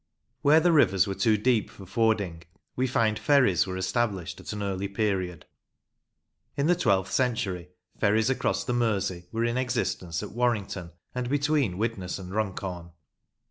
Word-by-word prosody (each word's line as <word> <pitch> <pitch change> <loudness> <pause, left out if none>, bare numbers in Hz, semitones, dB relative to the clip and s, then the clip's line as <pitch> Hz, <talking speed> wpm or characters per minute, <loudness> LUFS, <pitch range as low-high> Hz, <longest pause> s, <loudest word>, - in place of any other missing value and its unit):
Where 150 +2 +6
the 175 +2 +3
rivers 95 - +4
were 100 - -2
too 105 +3 +2
deep 115 0 +1
for 95 - -12
fording, 100 -4 0 0.3
we 130 +1 +1
find 115 -3 +1
ferries 130 - +3
were 95 0 -4
established 95 -2 -1
at - - -7
an 105 -1 -4
early 100 0 -2
period. 95 -5 -2 1.1
In 140 - +1
the 175 - +5
twelfth 95 - +1
century 100 -9 -1 0.3
ferries 110 +4 +3
across 135 - 0
the 125 - -2
Mersey 100 -7 0
were 115 +1 0
in 120 +2 0
existence 115 -9 -2
at - - -7
Warrington 105 -7 -1 0.2
and 125 -1 -3
between 145 -8 +1
Widnes 100 -4 -2
and 95 -1 -8
Runcorn. 95 -5 -3
105 Hz, 155 wpm, -27 LUFS, 95-125 Hz, 1.1 s, Where